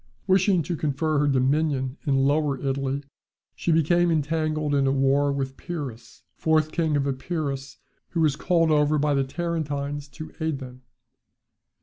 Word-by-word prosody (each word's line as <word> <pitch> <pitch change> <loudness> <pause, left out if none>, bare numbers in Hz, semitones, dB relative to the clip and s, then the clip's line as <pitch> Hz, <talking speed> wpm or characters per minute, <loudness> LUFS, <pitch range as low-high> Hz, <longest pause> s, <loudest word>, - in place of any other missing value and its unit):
Wishing 190 -2 +3
to 175 - -3
confirm 150 0 0
her 145 - +2
dominion 135 0 +1
in 140 - +3
Lower 145 -1 +1
Italy, 135 +1 -2 0.5
she 170 - -1
became 170 +2 +3
entangled 155 -1 0
in 140 -1 +3
a - - +3
war 140 +1 +2
with 135 -1 -3
Pyrrhus, 145 -10 -7
fourth 155 -1 +1
king 160 -4 +1
of 140 - 0
Epirus, 140 0 -3 0.3
who 170 - -1
was 150 -3 +3
called 165 +1 +2
over 150 0 +3
by 145 0 +1
the 140 -1 +2
Tarentines 145 -2 -3
to 150 +3 -10
aid 160 -2 0
them. 130 -1 -10
145 Hz, 150 wpm, -25 LUFS, 135-160 Hz, 0.5 s, Wishing